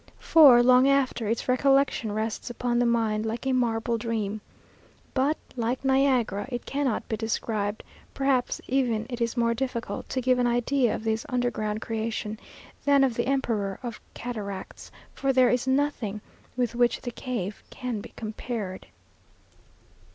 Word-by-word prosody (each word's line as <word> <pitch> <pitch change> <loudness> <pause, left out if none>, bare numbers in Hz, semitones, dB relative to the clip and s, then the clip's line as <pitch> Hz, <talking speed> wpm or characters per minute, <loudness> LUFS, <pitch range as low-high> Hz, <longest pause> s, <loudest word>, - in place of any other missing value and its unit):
For, 275 -7 +7
long 255 +1 +6
after, 265 -5 +1
its 225 +2 -1
recollection 270 -3 +2
rests 220 +2 -3
upon 240 0 -1
the 245 - +3
mind, 225 -2 +1
like 225 +3 -4
a 265 - +1
marble 235 -2 0
dream. 215 -2 -2 0.7
But, 280 +4 +1 0.2
like 245 +2 -2
Niagara, 260 -5 +2
it 245 -1 -4
cannot 275 -5 -1
be 220 - -1
described; 215 -1 -2 0.3
perhaps 270 -2 +1
even 245 -4 +1
it 240 0 -4
is 235 +1 -1
more 235 0 +2
difficult 250 -1 -4
to 260 - -1
give 255 0 +2
an 245 - +3
idea 245 +1 +1
of - - -6
this 220 0 0
underground 235 -4 -1
creation, 220 -1 -3 0.4
than 280 -1 +5
of 260 -3 +2
the 240 +2 -1
emperor 225 -8 -1
of 235 -3 -6
cataracts; 205 -5 -6 0.2
for 270 - 0
there 255 -1 +5
is 250 +1 0
nothing 260 -7 0 0.4
with 245 -2 0
which 240 0 +2
the 245 - -5
cave 220 -5 -4
can 245 -4 -4
be - - -11
compared. 215 -3 -5
240 Hz, 150 wpm, -26 LUFS, 220-255 Hz, 0.7 s, For